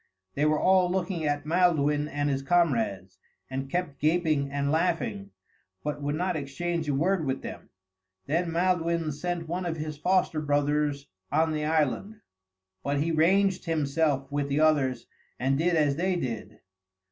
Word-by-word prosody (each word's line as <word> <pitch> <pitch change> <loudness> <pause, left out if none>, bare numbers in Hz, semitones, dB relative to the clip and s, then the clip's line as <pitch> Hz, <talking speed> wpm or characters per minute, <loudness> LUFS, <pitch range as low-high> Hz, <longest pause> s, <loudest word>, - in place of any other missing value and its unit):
They 145 - +1
were 155 0 +3
all 185 -1 +4
looking 180 -3 -1
at 145 0 -1
Maelduin 150 -3 +2
and 145 0 -2
his 135 -1 0
comrades, 115 - 0 0.3
and 135 +1 -4
kept 175 -4 -2
gaping 155 -3 +1
and 140 0 -1
laughing, 180 +4 0 0.5
but 150 0 -3
would 145 +1 -1
not 180 +2 -1
exchange 155 +3 -3
a 140 - +1
word 175 +4 +1
with 135 -2 -2
them. - - -8 0.6
Then 165 +4 0
Maelduin 170 -2 +1
sent 170 +3 -3
one 175 +3 -2
of 170 -2 -3
his 155 -1 -5
foster 180 -3 +1
brothers 145 -1 0 0.3
on 160 +2 +2
the 150 -1 -1
island; 160 - 0 0.6
but 140 +5 -1
he 160 +3 0
ranged 190 +4 +3
himself 150 -3 0
with 145 0 -1
the 140 +2 +1
others 140 -6 +2 0.3
and 135 +2 +1
did 175 +1 +2
as 145 -3 +2
they 185 +2 +1
did. 115 -8 -5
155 Hz, 160 wpm, -27 LUFS, 140-175 Hz, 0.6 s, all